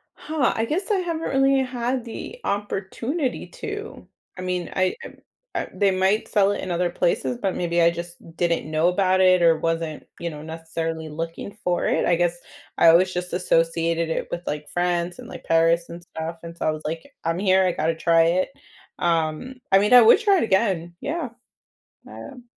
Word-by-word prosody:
Huh, 300 -4 0
I 225 - 0
guess 370 - -2
I 405 - +3
haven't 340 -3 -2
really 270 0 +3
had 250 0 -2
the 240 - -8
opportunity 220 - -2
to, 425 -3 -7 0.3
I - - -6
mean, 180 -2 -2
I, 185 -1 +1
um, - - -10 0.4
uh - - -2
they 200 -1 +2
might 190 +3 +1
sell 200 -2 +3
it - - -4
in 185 - -4
other 175 +1 +1
places, 155 -8 0
but 190 - -1
maybe 170 -1 +1
I 170 - +6
just 170 0 -7 0.2
didn't 170 -3 0
know 155 +2 +2
about 185 +1 +2
it, 185 -1 +5
or 165 -1 +5
wasn't, 165 -1 -2 0.2
you 170 - -3
know, 150 -2 -8
necessarily 160 0 -5
looking 165 +6 -6
for 175 -1 0
it, - - +1
I 175 - +3
guess, 175 0 0 0.4
I - - +5
always 185 +3 +5
just 180 0 -4
associated 165 -1 +1
it - - -2
with, 175 - -3
like, 150 0 -4
France, 175 0 -1
and, - - -9
like, - - -10
Paris, 165 +1 +2
and 170 +1 -9
stuff, 165 0 -6
and 170 0 -8
so, - - -3
I - - +3
was 155 0 -6
like, 165 +1 -3 0.2
"I'm 165 +1 0
here, 190 -1 +4
I 180 - +2
gotta 160 +1 0
try 165 0 +4
it." 175 +3 +1 0.5
Um, 165 +8 0 0.2
I 195 - +7
mean, 210 +4 +2
I 250 - +10
would 230 - +7
try 410 -4 +3
it - - +1
again, 190 -5 0
yeah, 320 -3 -3 0.8
I, - - -13
um 255 -3 -11
175 Hz, 200 wpm, -23 LUFS, 165-210 Hz, 0.8 s, I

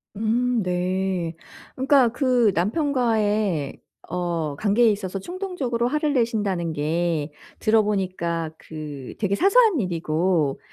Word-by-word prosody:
음 230 +1 +1
네. 180 -1 -1 0.4
그러니까 265 -2 +4
그 245 -4 +2
남편과의 215 - 0 0.3
어 170 -4 -2
관계에 220 +6 +3
있어서 195 -1 -4
충동적으로 285 - -2
화를 300 +2 0
내신다는 205 - 0
게 155 0 -1 0.3
들어 215 0 +3
보니까 180 -5 -2
그 150 -4 -8
되게 200 -2 +1
사소한 400 - +4
일이고 165 -4 0
200 Hz, 245 characters per minute, -23 LUFS, 170-240 Hz, 0.4 s, 그러니까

